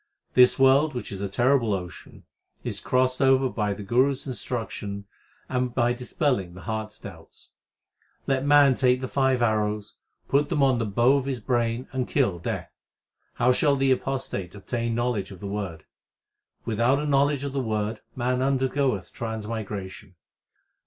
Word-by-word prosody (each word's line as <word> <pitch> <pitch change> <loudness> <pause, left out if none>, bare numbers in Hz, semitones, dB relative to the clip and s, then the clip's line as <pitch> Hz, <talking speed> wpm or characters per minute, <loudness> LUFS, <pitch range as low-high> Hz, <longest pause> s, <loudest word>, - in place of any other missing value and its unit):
This 125 0 +6
world 135 +2 +4
which 125 - -5
is 100 -1 -6
a 100 - -2
terrible 120 0 +2
ocean, 90 -3 -9 0.4
is - - -3
crossed 130 0 +1
over 135 0 +4
by 105 -4 -1
the 105 - -8
Guru 125 +7 +3
s 135 - -7
instruction 110 -6 -4 0.4
And 125 -1 -2
by 120 -1 +2
dispelling 125 - -1
the 95 - -10
heart 110 -1 -3
s 110 - -12
doubts. 80 -5 -12 0.8
Let 135 -1 0
man 145 -1 +6
take 125 0 +2
the 130 - -3
five 130 -2 +1
arrows, 105 -2 0 0.4
1 140 +2 +4
put - - -19
them 150 -5 +1
on 130 -3 +3
the 115 - -1
bow 120 +7 +3
of 135 - -2
his 130 -3 -2
brain 120 +1 -1
and 130 -2 -2
kill 110 -12 +1
Death. - - -4 0.6
How 125 +1 +3
shall 140 +2 +3
the 135 -1 +2
apostate 130 -9 -2
obtain 115 +3 -3
knowledge 120 -5 -1
of 95 -3 -11
the 100 - -8
Word? 100 -5 -5 0.8
Without 115 +4 +2
a 150 - -2
knowledge 140 -1 +2
of 140 -1 -4
the 140 - 0
Word 110 -2 -2
man 125 +1 0
undergoeth 130 -5 0
transmigration. 110 -3 -5
120 Hz, 165 wpm, -25 LUFS, 105-135 Hz, 0.8 s, This